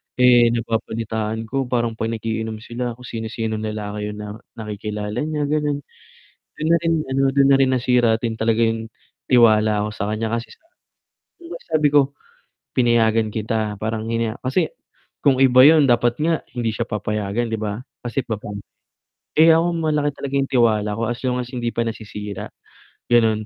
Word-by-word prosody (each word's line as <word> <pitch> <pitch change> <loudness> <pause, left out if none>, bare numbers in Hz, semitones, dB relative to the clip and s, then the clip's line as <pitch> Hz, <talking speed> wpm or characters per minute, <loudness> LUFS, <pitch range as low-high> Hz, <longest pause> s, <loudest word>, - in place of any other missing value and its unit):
Eh, 125 -1 +6
nababalitaan 110 -1 -2
ko 135 +1 -1
parang 120 -2 0
'pag 110 - -1
nag-iinom 110 0 -4
sila, 120 0 -4
kung 125 - -15
sino-sinong 110 -2 -4
lalaki 105 -1 -4
'yong 105 - -9
na 105 - -6 0.3
nakikilala 105 -1 -5
niya, 155 -1 -2
gano'n. 150 -1 0 0.8
Do'n 155 - -2
na - - +7
rin 165 0 +2
ano, 135 +1 0
do'n 140 0 +4
na 140 - +6
rin 130 -1 +3
nasira 125 -3 +3
din 115 -1 -2
talaga 110 0 +1
'yong, 115 0 -2 0.4
tiwala 110 -3 +4
ko - - -4
sa 105 0 -2
kaniya. 110 +1 -2
Kasi 115 0 -2
sa 310 - -18 0.7
'di 345 - -15
ba, 335 - -7
sabi 155 -2 +3
ko, 140 -1 +3 0.6
"Pinayagan 115 -3 +3
kita," 110 -1 -2
parang 110 +1 -2
hinaya 115 0 -1
kasi, 145 +6 +1 0.6
kung 135 -2 +4
iba 130 -1 +7
'yon 155 -2 +6
dapat 120 +1 +2
nga 165 -1 +2 0.2
hindi 120 -2 -1
siya 115 - -1
papayagan, 105 +1 -2
'di 110 - -1
ba, 105 0 -3 0.3
kasi, 120 +3 -1
babae. 105 -2 -5 0.8
Eh, 160 +1 +7
ako 170 +1 +1
malaki 150 -2 0
talaga 140 -1 -5
'yong 135 -1 +1
tiwala 110 -5 +3
ko, 115 - -1
as 120 +1 -3
long 125 -1 0
as, 125 0 -5
hindi 120 -2 -2
pa 115 - +1
nasisira, 105 -2 -6 0.6
gano'n. 110 -3 +3
115 Hz, 170 wpm, -21 LUFS, 110-130 Hz, 0.8 s, na